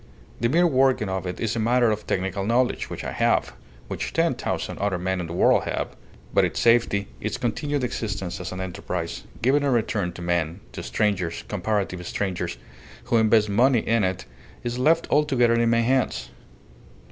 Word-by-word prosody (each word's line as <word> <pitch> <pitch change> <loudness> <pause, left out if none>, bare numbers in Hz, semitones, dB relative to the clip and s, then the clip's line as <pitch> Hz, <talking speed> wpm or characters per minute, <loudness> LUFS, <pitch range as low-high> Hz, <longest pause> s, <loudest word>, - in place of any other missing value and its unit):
The 115 - +1
mere 175 +6 +4
working 130 - +3
of 95 -1 -2
it 90 - -5
is 115 +1 -1
a - - -1
matter 120 +1 +3
of 105 0 -4
technical 95 +1 -1
knowledge, 120 +4 +1
which - - -6
I - - -4
have - - +1 0.3
which - - -4
ten - - +2
thousand - - -3
other 100 -2 0
men 95 +1 -1
in 85 - -5
the 85 - -6
world 90 - +3
have. - - -2 0.4
But - - +4
its - - -1
safety, 115 -4 +3
its 110 0 -3
continued 140 +4 -1
existence 105 -7 -3
as 90 - -5
an 95 0 -5
enterprise, 90 -2 -4 0.2
giving 135 +4 +4
a 140 - +1
return 110 -7 0
to 85 - -8
men 85 +1 -1
to - - -6
strangers, 95 -6 -1
comparative 100 -2 -2
strangers 95 -10 -2 0.5
who 120 - +1
invest 110 -1 +4
money 120 +3 +3
in 115 -1 +3
it, 95 0 -1 0.4
is 120 +1 -3
left 165 +5 +3
altogether 130 -6 +3
in 115 0 +3
my 115 0 +3
hands. 125 - 0
110 Hz, 180 wpm, -24 LUFS, 95-120 Hz, 0.5 s, mere